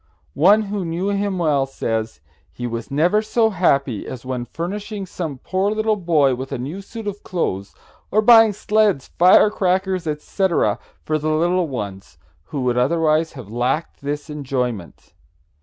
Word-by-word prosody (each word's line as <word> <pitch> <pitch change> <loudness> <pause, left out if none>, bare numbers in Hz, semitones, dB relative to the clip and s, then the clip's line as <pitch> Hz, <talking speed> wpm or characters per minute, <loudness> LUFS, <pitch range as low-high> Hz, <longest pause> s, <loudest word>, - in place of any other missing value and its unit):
One 200 +8 +5
who 200 -1 -3
knew 175 +4 -2
him 200 -1 -1
well 145 -6 +1
says: 115 -4 -3 0.3
"He 120 - -6
was 115 -1 -4
never 170 +9 +2
so 220 0 +1
happy 140 - +1
as 130 -1 -8
when 125 -2 -3
furnishing 200 - -5
some 165 -6 -5
poor 190 +8 -1
little 215 0 +1
boy 160 -8 +2
with 130 +2 -6
a 135 - -2
new 145 +11 -5
suit 225 +3 -9
of 205 0 -5
clothes, 100 - -3 0.3
or 215 +1 +2
buying 225 -1 +7
sleds, 210 -7 +1
fire 185 +4 +6
crackers, 185 -2 0
etc., 165 +4 0 0.2
for 155 0 -1
the 155 +1 -2
little 170 +3 +1
ones 100 - -6 0.3
who 145 -4 -4
would 125 -1 +1
otherwise 160 +3 +2
have 120 -7 -10
lacked 125 +7 -2
this 145 +2 -4
enjoyment." 125 - -4
165 Hz, 155 wpm, -21 LUFS, 130-195 Hz, 0.3 s, buying